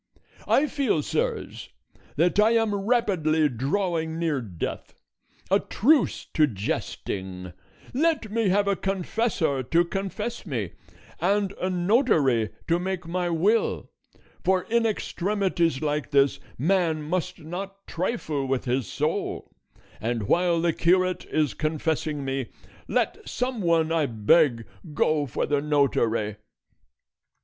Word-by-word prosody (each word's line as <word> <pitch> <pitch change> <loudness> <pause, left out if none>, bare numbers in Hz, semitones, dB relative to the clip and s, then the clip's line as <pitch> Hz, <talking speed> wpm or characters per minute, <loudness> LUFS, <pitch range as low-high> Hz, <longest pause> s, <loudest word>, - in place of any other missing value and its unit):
I 280 - +4
feel, 270 - 0
sirs, - - -2 0.5
that 175 +6 +2
I 220 +2 +5
am 225 -2 +2
rapidly 195 -8 +2
drawing 160 - -1
near 160 -5 0
death: 95 -8 -6 0.6
a 195 - +5
truce 275 +8 +2
to 155 -1 +4
jesting; 95 -4 -4 0.4
let 290 -5 +1
me 225 -2 +1
have 200 +2 +2
a 200 - +2
confessor 190 - -1
to 165 +7 +2
confess 195 +6 -4
me, 120 - -3 0.5
and 195 +3 +1
a 185 - 0
notary 175 - +2 0.2
to 170 +1 +2
make 185 -1 -3
my 175 +1 -1
will; 190 +7 +1 0.5
for 185 -1 +2
in 230 0 +1
extremities 185 -7 0
like 150 0 -1
this, 140 0 +3 0.2
man 165 +1 +1
must 180 +3 -2
not 195 +5 -7
trifle 160 - -2
with 130 -1 -1
his 125 -3 0
soul; 90 - -2 0.5
and 115 +1 -2
while 170 - +2
the 170 0 +1
curate 185 +2 +2
is 150 -7 0
confessing 155 +1 -2
me, 135 -2 -2 0.4
let - - 0
some 250 -2 -2
one, 165 -2 +2
I 160 -3 +2
beg, 115 +2 +3 0.3
go 150 -1 +2
for - - -1
the 145 0 +1
notary." 120 -8 +1
165 Hz, 125 wpm, -26 LUFS, 140-195 Hz, 0.6 s, I